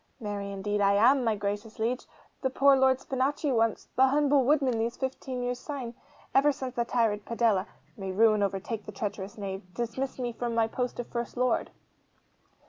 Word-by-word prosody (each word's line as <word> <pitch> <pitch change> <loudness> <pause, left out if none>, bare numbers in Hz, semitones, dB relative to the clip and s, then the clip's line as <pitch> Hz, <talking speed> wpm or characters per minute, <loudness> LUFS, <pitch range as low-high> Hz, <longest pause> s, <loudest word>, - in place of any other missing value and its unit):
'Marry, 205 -3 -4
indeed, 205 +1 -2
am 205 +7 +5
I, - - -1
my 225 -3 +1
gracious 205 +2 -4
liege 240 +3 -1 0.3
the 265 - +1
poor 275 +1 +5
Lord 265 -1 +4
Spinachi 270 +3 -1
once 225 -2 +1
the 265 +2 +6
humble 285 0 +3
woodman 265 -3 +2
these 230 +2 -1
fifteen 260 -1 -4
years 245 0 -2
syne. 260 -6 -5 0.4
Ever 285 +2 +5
since 260 -2 -5
the 235 -2 0
tyrant 220 -4 +1
Padella 225 -4 +1 0.3
(may 195 -4 -5
ruin 215 +1 +4
overtake 200 +3 -2
the - - -5
treacherous 200 0 -5
knave!) 195 -1 -4
dismissed 245 +3 -3
me 245 -2 -2
from 235 0 -3
my 225 -1 +3
post 250 +2 -3
of 245 - -2
First 235 0 -4
Lord. 250 0 +1
235 Hz, 180 wpm, -28 LUFS, 210-260 Hz, 0.4 s, the